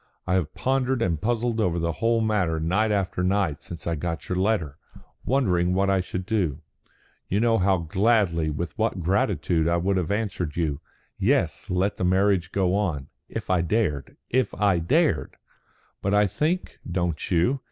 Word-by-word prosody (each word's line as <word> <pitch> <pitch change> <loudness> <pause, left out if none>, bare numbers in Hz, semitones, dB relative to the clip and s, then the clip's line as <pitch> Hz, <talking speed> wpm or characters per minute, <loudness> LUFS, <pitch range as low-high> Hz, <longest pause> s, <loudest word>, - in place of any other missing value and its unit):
I 90 - 0
have 90 -5 0
pondered 130 -1 0
and 85 -5 -1
puzzled 120 0 0
over 90 -5 +1
the 85 0 0
whole 115 +6 +1
matter 100 -7 +1
night 95 +7 +1
after 95 -3 -1
night 95 -4 0
since 85 -4 -9
I 85 - 0
got 80 +1 -4
your 90 - -1
letter, 95 -7 0 0.5
wondering 90 -9 +2
what 100 +1 +2
I 95 -1 +2
should 90 0 -5
do. 90 - 0 0.7
You 100 - +1
know 115 0 +3
how 95 0 +3
gladly, 85 -1 +1
with 80 +2 -4
what 110 -5 0
gratitude, 85 -2 +1
I 85 0 +2
would 95 +3 +1
have 90 -4 -1
answered 100 -7 -2
you, 75 -4 -1 0.4
'Yes, - - +1
let 95 +3 0
the - - -2
marriage 95 -1 +2
go 95 -2 +1
on,' 85 -10 -1 0.2
if - - -4
I 90 -2 +3
dared. 85 -5 -1
If 125 -3 +1
I 100 -4 +2
dared! 85 - +1 0.7
But 100 +1 +1
I 105 0 +5
think 155 - -2
don't 85 -3 -2
you? 95 +11 +2
95 Hz, 175 wpm, -25 LUFS, 85-105 Hz, 0.7 s, I